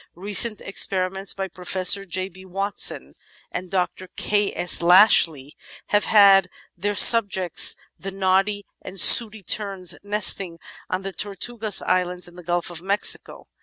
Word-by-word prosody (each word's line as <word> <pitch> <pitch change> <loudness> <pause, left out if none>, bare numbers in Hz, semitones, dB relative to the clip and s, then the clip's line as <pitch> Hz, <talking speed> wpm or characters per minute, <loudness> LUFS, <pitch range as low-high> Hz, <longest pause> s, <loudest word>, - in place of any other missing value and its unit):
Recent 205 +4 +1
experiments 190 0 -1
by 195 -1 -5
Pro 180 0 -16
fessor 190 +2 +1
J. 185 +1 -4
B. 190 0 -17
Watson 195 +2 -3 0.4
and 185 - -7
Dr. 185 0 -4
K. 205 -1 -1
S. 175 - +3
Lashley 170 -6 +3 0.3
have 205 0 0
had 195 -3 +4
as - - -40 0.2
their 205 +4 -4
sub 230 -2 +5
jects 185 -3 +2 0.2
the 195 - -8
Noddy 195 +1 -2 0.2
and 185 +1 -7
Sooty 220 +2 +6
Terns 190 -3 -3
nesting 200 -4 +1 0.3
on 185 +1 -4
the 195 0 -7
Tortugas 210 +2 -3
Islands 180 0 -3
in 175 - -18
the 180 - -12
Gulf 175 0 -4
of 170 -1 -9
Mexico. 200 +3 -2
190 Hz, 150 wpm, -21 LUFS, 180-205 Hz, 0.4 s, Sooty